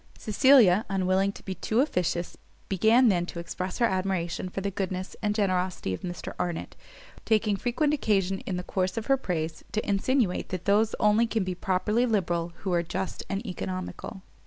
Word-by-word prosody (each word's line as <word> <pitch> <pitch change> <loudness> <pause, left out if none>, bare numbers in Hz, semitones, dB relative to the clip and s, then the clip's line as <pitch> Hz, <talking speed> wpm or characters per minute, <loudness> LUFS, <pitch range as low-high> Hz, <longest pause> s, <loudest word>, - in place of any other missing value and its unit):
Cecilia, 220 -4 +5
unwilling 190 +1 +1
to - - -13
be 190 - -3
too 220 +4 -1
officious, 180 - 0 0.3
began 225 +6 +5
then 175 -3 +1
to - - -8
express 180 +2 -4
her 240 - +3
admiration 185 -3 -1
of 180 - -11
the 200 - -1
goodness 185 -1 -4
and 210 -1 0
generosity 185 - 0
of - - -5
Mr 175 -1 -6
Arnott; 175 -2 -3 0.5
taking 215 -2 +2
frequent 250 +8 0
occasion, 195 -8 +1
in 185 - -1
the 180 - -4
course 185 +3 -2
of 225 - -2
her 270 - +4
praise, 165 -8 -3
to 215 - -1
insinuate 205 0 +1
that 185 -2 -5
those 215 +2 +3
only 210 +2 +4
can 225 -2 0
be 185 0 -2
properly 195 +6 +1
liberal, 175 -6 0
who 190 -2 -1
are 170 - +3
just 185 +2 -4
and 200 +3 -3
economical. 185 0 -5
195 Hz, 180 wpm, -27 LUFS, 180-220 Hz, 0.5 s, Cecilia